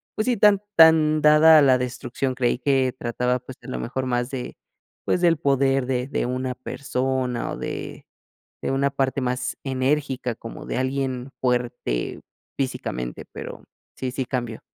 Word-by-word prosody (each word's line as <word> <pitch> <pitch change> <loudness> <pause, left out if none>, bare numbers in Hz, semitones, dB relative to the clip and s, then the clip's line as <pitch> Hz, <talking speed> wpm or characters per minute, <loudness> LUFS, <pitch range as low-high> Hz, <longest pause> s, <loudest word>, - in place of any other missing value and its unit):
pues 215 - -1
sí 245 -3 +2
tan 205 -1 +5
tan 155 -2 +6
dada 155 +1 +7
a - - +5
la 130 -2 +5
destrucción, 125 +1 -3
creí 125 -2 +1
que 130 -2 +1
trataba 125 +1 0
pues 125 +1 -11
a - - -13
lo 130 - -4
mejor 130 +2 -3
más 120 0 -1
de 130 -2 -5 0.5
pues, - - +1
del 170 -2 +5
poder 135 -2 +2
de 125 0 -1
de - - -1
una 125 0 -2
persona, 130 -2 -2
o - - -5
de - - -6 0.6
de - - -1
una 140 +1 +2
parte 135 -1 -1
más 125 0 -2
enérgica 130 -2 -1
como 115 - -9
de - - -3
alguien 130 -1 -2
fuerte 120 - -1 0.4
físicamente, 60 - -3
pero, - - -8 0.3
sí 130 -1 -3
sí 130 0 -3
cambió. 120 -3 -3
130 Hz, 165 wpm, -24 LUFS, 125-140 Hz, 0.6 s, dada